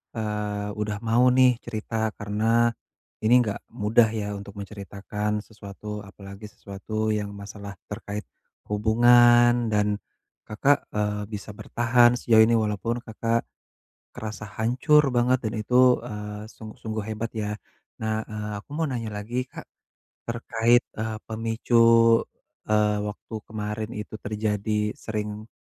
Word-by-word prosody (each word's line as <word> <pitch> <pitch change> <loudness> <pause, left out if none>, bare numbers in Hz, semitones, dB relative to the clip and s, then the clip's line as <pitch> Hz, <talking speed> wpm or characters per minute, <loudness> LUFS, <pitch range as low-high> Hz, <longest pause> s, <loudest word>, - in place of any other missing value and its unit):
eee, 105 -1 -3
udah 105 -1 -2
mau 115 +2 +4
nih 130 -1 +7 0.2
cerita 115 -1 -5 0.2
karena 105 +1 -2 0.8
ini 110 +2 +4
nggak 105 -3 -3 0.2
mudah 110 +2 +5
ya 105 - -3
untuk 100 0 -10
menceritakan 105 +1 -4
sesuatu, 105 0 -8
apalagi 100 +1 -11
sesuatu 100 +2 -10 0.2
yang 105 -1 -3
masalah 100 0 -8 0.2
terkait 105 0 -5 0.5
hubungan, 120 +2 +5
dan 105 0 +2 0.6
Kakak, 135 +7 +3 0.2
eee, 105 0 0
bisa 105 0 -6
bertahan 120 +3 +3
sejauh 110 -2 +6
ini 115 - +3
walaupun 110 +2 -1
Kakak 115 +1 -1 0.7
kerasa 110 0 -6
hancur 135 +6 +3
banget 125 +1 +3
dan 110 - -1
itu, 110 +3 +1 0.3
eee, 105 -2 -6
sungguh-sungguh 110 -1 -6
hebat 110 +1 -3
ya. 105 -2 -2 0.5
Nah, 110 0 0
eee, 105 0 -5
aku - - -38
mau 165 - +1
nanya 115 -4 -3
lagi 115 +5 -3
Kak - - -10 0.6
terkait, 115 +1 +2 0.2
eee, 110 0 -2
pemicu, 115 +1 +1 0.9
eee, 105 -1 +3
waktu 105 +2 -9
kemarin 105 0 -4
itu 105 +1 -7
terjadi 105 0 -1
sering 105 0 -5
110 Hz, 125 wpm, -25 LUFS, 105-115 Hz, 0.9 s, nih